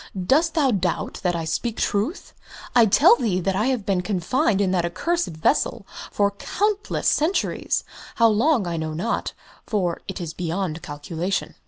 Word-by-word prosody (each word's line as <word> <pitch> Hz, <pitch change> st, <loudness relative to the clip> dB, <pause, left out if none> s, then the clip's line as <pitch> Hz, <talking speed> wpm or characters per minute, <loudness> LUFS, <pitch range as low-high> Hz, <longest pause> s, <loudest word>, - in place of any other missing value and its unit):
"Dost 305 Hz, -, +2 dB
thou 285 Hz, -5 st, +3 dB
doubt 185 Hz, -5 st, -1 dB
that 180 Hz, -2 st, 0 dB
I 165 Hz, -1 st, -3 dB
speak 225 Hz, +7 st, -2 dB
truth? 220 Hz, -, -2 dB, 0.4 s
I 235 Hz, -2 st, +6 dB
tell 215 Hz, -, +6 dB
thee 210 Hz, -8 st, 0 dB
that 185 Hz, +1 st, -1 dB
I 215 Hz, +5 st, +1 dB
have 250 Hz, -6 st, -1 dB
been 190 Hz, -3 st, +1 dB
confined 200 Hz, -, 0 dB
in 195 Hz, -2 st, +2 dB
that 180 Hz, -2 st, +1 dB
accursed 340 Hz, -, -1 dB
vessel 160 Hz, -, 0 dB, 0.2 s
for 200 Hz, -1 st, +1 dB
countless 415 Hz, -, -1 dB
centuries 325 Hz, +6 st, +1 dB, 0.3 s
how 230 Hz, -, +5 dB
long, 230 Hz, +1 st, +2 dB
I 170 Hz, -1 st, -3 dB
know 155 Hz, -1 st, -3 dB
not, 220 Hz, +9 st, -2 dB, 0.3 s
for 180 Hz, -6 st, -1 dB
it 190 Hz, -, -5 dB
is 165 Hz, -3 st, -5 dB
beyond 170 Hz, -1 st, -3 dB
calculation." 160 Hz, +7 st, -3 dB
195 Hz, 165 wpm, -23 LUFS, 175-245 Hz, 0.4 s, I